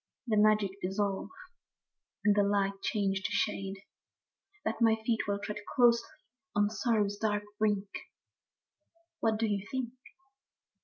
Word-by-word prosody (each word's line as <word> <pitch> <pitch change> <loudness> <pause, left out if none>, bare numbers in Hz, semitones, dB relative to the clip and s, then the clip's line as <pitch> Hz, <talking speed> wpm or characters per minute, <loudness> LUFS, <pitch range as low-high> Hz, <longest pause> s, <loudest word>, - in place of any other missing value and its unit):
The 225 -3 +1
magic 210 -2 +4
dissolve, 195 +1 -1 1.0
and 205 -1 +5
the 205 - +5
light 200 -1 +1
change 195 -3 0
to - - -2
shade; 195 -1 -1 0.8
That - - -2
my 225 -1 +6
feet 225 -2 0
will 200 0 0
tread 210 +1 -5 0.2
closely 235 -2 +4 0.5
on 205 0 +3
sorrow's 215 -3 +1
dark 210 -1 0 0.2
brink, 205 -2 +1 0.7
— 335 0 -43
What 220 -1 +2
do 225 - +1
you 205 -2 -1
think? 255 -3 -2
210 Hz, 135 wpm, -31 LUFS, 200-225 Hz, 1.0 s, my